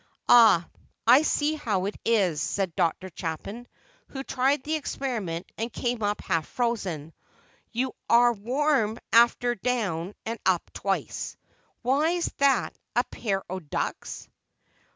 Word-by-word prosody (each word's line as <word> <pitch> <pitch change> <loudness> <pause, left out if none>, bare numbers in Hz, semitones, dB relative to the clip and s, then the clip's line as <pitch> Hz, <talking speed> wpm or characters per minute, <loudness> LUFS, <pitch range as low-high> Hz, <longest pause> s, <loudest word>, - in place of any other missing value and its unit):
"Ah, 220 -8 +7 0.4
I 250 +5 +8
see 310 -1 +1
how 210 -11 -1
it 205 - -3
is," 190 -9 +2
said 190 -4 -1
Dr. 185 +3 0
Chapin, 200 +10 -5 0.4
who 270 -1 -6
tried 265 +1 +1
the 310 - -2
experiment 235 - -3
and 230 +2 -2
came 240 0 -2
up 205 0 -1
half 165 -2 -1
frozen; 190 - -2 0.6
"you 250 +2 -1 0.2
are 240 0 +6
warm 240 0 +1 0.2
after 235 +1 +5
down 205 -6 -2
and 230 0 -4
up 185 -3 +1
twice? 195 -1 -3 0.5
Why, 300 +8 +2 0.2
that's 275 -2 +2 0.2
a 245 - +4
pair 195 -4 -2
o' 185 +1 -4
ducks!" 155 -5 -4
230 Hz, 130 wpm, -26 LUFS, 190-255 Hz, 0.6 s, I